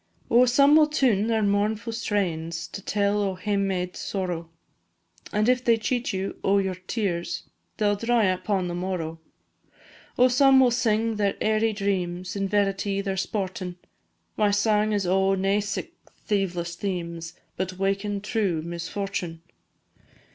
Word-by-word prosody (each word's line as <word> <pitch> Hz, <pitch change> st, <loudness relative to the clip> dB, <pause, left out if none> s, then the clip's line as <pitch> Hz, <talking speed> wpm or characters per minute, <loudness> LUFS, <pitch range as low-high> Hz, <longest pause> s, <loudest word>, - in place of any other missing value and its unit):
Oh, 245 Hz, +2 st, +6 dB
some 280 Hz, +4 st, +5 dB
will 310 Hz, -1 st, +6 dB
tune 245 Hz, -9 st, +2 dB
their 225 Hz, -2 st, +1 dB
mournfu' 210 Hz, +3 st, 0 dB
strains, 170 Hz, -7 st, -2 dB
To 200 Hz, -, -7 dB
tell 205 Hz, +1 st, +1 dB
o' 195 Hz, -2 st, -1 dB
hame 200 Hz, +1 st, 0 dB
made 180 Hz, -1 st, -2 dB
sorrow, 175 Hz, -4 st, -3 dB, 0.8 s
And 210 Hz, +1 st, +1 dB
if 250 Hz, 0 st, +3 dB
they 230 Hz, -2 st, +4 dB
cheat 245 Hz, +2 st, -1 dB
you 190 Hz, 0 st, -4 dB
o' 195 Hz, +1 st, +3 dB
your 190 Hz, -1 st, 0 dB
tears, 185 Hz, -1 st, -3 dB, 0.3 s
They 215 Hz, -, 0 dB
'll 205 Hz, -, +3 dB
dry 230 Hz, +2 st, +2 dB
upon 185 Hz, 0 st, 0 dB
the 175 Hz, -, -4 dB
morrow. 175 Hz, -3 st, -3 dB, 1.0 s
Oh, 250 Hz, -, +6 dB
some 265 Hz, +1 st, +5 dB
will 255 Hz, -2 st, +5 dB
sing 225 Hz, -2 st, +1 dB
their 200 Hz, -1 st, +1 dB
airy 220 Hz, +1 st, +2 dB
dreams, 185 Hz, -3 st, -2 dB
In 195 Hz, -1 st, -1 dB
verity 200 Hz, 0 st, 0 dB
they're 195 Hz, -1 st, -2 dB
sportin', 185 Hz, -2 st, -3 dB, 0.6 s
My 210 Hz, -1 st, +3 dB
sang 210 Hz, +1 st, +2 dB
's 205 Hz, -2 st, 0 dB
o' 190 Hz, +2 st, +2 dB
nae 195 Hz, +2 st, +1 dB
sic 205 Hz, 0 st, -4 dB, 0.3 s
thieveless 180 Hz, -4 st, -1 dB
themes, 170 Hz, -3 st, -4 dB, 0.2 s
But 185 Hz, 0 st, -3 dB
wakin' 200 Hz, +1 st, -1 dB
true 200 Hz, -7 st, -1 dB
misfortune. 170 Hz, 0 st, -4 dB
200 Hz, 145 wpm, -25 LUFS, 185-215 Hz, 1.0 s, Oh